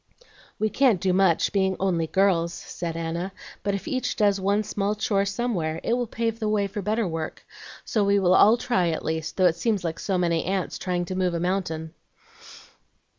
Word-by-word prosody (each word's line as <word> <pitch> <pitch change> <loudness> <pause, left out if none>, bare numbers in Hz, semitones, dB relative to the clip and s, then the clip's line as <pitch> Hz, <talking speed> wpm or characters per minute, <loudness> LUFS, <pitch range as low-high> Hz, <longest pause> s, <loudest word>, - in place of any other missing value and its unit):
"We 215 0 0
can't 255 -9 +3
do 185 +1 +1
much, 185 -3 +3
being 190 -1 +2
'only 175 -4 0
girls,'" 175 -2 +2
said 165 -1 -5
Anna; 170 +3 -3 0.3
"but 200 -1 -1
if 200 - -6
each 255 -1 -1
does 200 -2 +2
one 200 +2 +1
small 205 0 -1
chore 200 -2 +1
somewhere 195 -7 -2
it 230 - 0
will 245 0 0
pave 230 0 -2
the 215 -2 -1
way 210 -1 +1
for 200 +1 -4
better 215 +2 0
work; 160 -2 -5 0.4
so 215 -4 +1
we 200 0 +3
will 185 -2 +3
all 215 +5 +6
try, 185 -8 +1
at 160 - -3
least, 160 0 -3
though 185 - +4
it 170 -2 +3
seems 215 -5 0
like 165 -1 -3
so 190 -2 -1
many 170 -2 +1
ants 190 0 -2
trying 180 -1 -1
to 185 - -5
move 180 -2 0
a - - -1
mountain." 170 -3 -2
190 Hz, 200 wpm, -25 LUFS, 170-210 Hz, 0.4 s, all